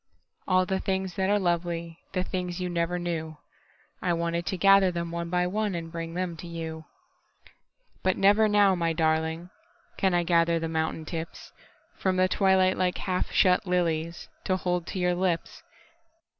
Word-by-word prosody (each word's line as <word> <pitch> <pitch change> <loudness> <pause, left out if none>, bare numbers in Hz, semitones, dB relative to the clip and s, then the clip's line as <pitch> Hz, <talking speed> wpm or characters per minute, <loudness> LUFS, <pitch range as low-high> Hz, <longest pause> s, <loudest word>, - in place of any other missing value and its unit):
All 185 -1 +3
the 190 0 -1
things 190 -1 -2
that 190 +2 0
are 205 - +4
lovely—The 170 0 -2
things 180 -1 -4
you 180 -1 -2
never 170 0 -1
knew—I 170 +1 -6
wanted 170 0 -2
to 190 - -1
gather 195 0 +6
them 170 -1 -4
one 170 0 -4
by 180 0 +1
oneAnd 180 -4 -2
bring 165 0 -5
them 180 -2 -2
to 175 - -8
you. 160 -1 -6 1.2
But 185 0 +1
never 205 +3 +5
now, 205 -2 +5
my 165 -2 0
darlingCan 160 +1 0 0.5
I 175 -3 +3
gather 170 -1 +3
the 165 0 -2
mountain 160 0 -2
tipsFrom 170 +3 -6
the 185 0 +4
twilight 190 0 +3
like 180 -1 +1
half 185 -1 -2
shut 180 0 +3
liliesTo 170 +1 -2
hold 180 -2 -2
to - - -5
your 180 -1 +1
lips. 175 -2 -2
175 Hz, 150 wpm, -27 LUFS, 165-185 Hz, 1.2 s, gather